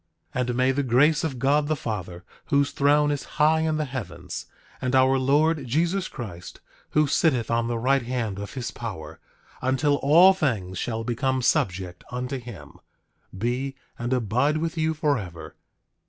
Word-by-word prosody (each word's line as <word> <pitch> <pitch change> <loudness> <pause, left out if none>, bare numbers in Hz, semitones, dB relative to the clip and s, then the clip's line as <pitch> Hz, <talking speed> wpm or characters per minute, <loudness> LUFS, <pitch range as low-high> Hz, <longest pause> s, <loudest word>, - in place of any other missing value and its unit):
9:26 125 - 0
And 120 - -1
may 130 +1 +3
the 140 +2 0
grace 140 +5 +3
of 145 -5 -2
God 145 +3 +2
the 155 - +1
Father, 90 - -5 0.2
whose 140 -1 +2
throne 145 +1 +3
is 145 -2 -2
high 155 +1 +4
in 160 -1 0
the 155 - -1
heavens, 130 -4 -6 0.3
and 130 0 0
our 130 0 +4
Lord 145 +2 +2
Jesus 175 +8 0
Christ, 90 -8 -8 0.4
who 150 - +5
sitteth 135 -5 +1
on 115 0 +1
the 120 0 -1
right 135 +4 +2
hand 115 -5 -3
of 100 +3 -7
his 125 -3 -4
power, 80 -9 -7 0.4
until 140 +3 +2
all 170 +8 +6
things 105 - -2
shall 115 -1 -2
become 130 +2 -1
subject 90 -5 0
unto 125 +2 -4
him, 120 -5 -11 0.6
be, 125 +6 -2 0.2
and 120 +1 -3
abide 125 +5 +1
with 165 +1 -2
you 160 0 0
forever. 100 - -2
130 Hz, 165 wpm, -25 LUFS, 115-150 Hz, 0.6 s, all